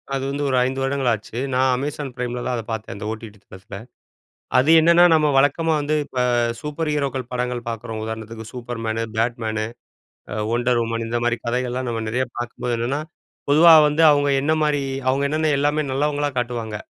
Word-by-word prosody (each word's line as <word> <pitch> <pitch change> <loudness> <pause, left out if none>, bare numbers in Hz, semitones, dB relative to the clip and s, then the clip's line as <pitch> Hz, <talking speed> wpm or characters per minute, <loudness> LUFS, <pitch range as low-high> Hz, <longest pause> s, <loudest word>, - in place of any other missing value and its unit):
அது 135 - -2
வந்து 145 +1 -3
ஒரு 130 - +1
5 130 +1 -2
வருடங்கள் 135 -1 0
ஆச்சு. 110 +1 -4 0.2
நான் 130 +1 +3
அமேசான் 140 +1 -4
பிரைம்லலாம் 125 0 -3
அதை 115 - -4
பாத்தேன். 110 -1 -5
அந்த 105 - -7
ஓடிடி 110 -1 -8
தளத்துல. 95 +1 -11 0.8
அது 140 +5 +4
என்னன்னா 170 +2 +5
நம்ம 155 -1 +3
வழக்கமா 155 +4 +2
வந்து 150 +1 -1
இப்போ 125 - -3 0.4
சூப்பர் 150 +1 -3
ஹீரோக்கள் 135 -4 -2
படங்கள் 125 -1 -2
பாக்கிறோம். 110 -1 -5
உதாரணத்துக்கு 110 0 -6
super 120 -2 -6
menu, 110 +1 -1
Batman 110 -2 -1 0.9
wonder 120 0 +1
woman 115 0 -3
இந்த 120 +1 -1
மாரி 120 0 +1
கதைகள்லாம் 125 +1 -2
நம்ம 115 -1 -3
நெறையா 125 +3 -1
பாக்கும்போது 120 0 -3
என்னன்னா 130 +5 -1 0.5
பொதுவா 165 +3 +7 0.2
வந்து 150 +2 +1
அவுங்க 145 0 +2
என்ன 155 +2 +1
மாரி 145 -2 +1 0.3
அவுங்க 140 +2 0
என்னென்ன 155 0 +1
எல்லாமே 145 +1 +1
நல்லவங்களா 145 +1 0
காட்டுவாங்க. 115 -3 -5
125 Hz, 165 wpm, -22 LUFS, 115-145 Hz, 0.9 s, பொதுவா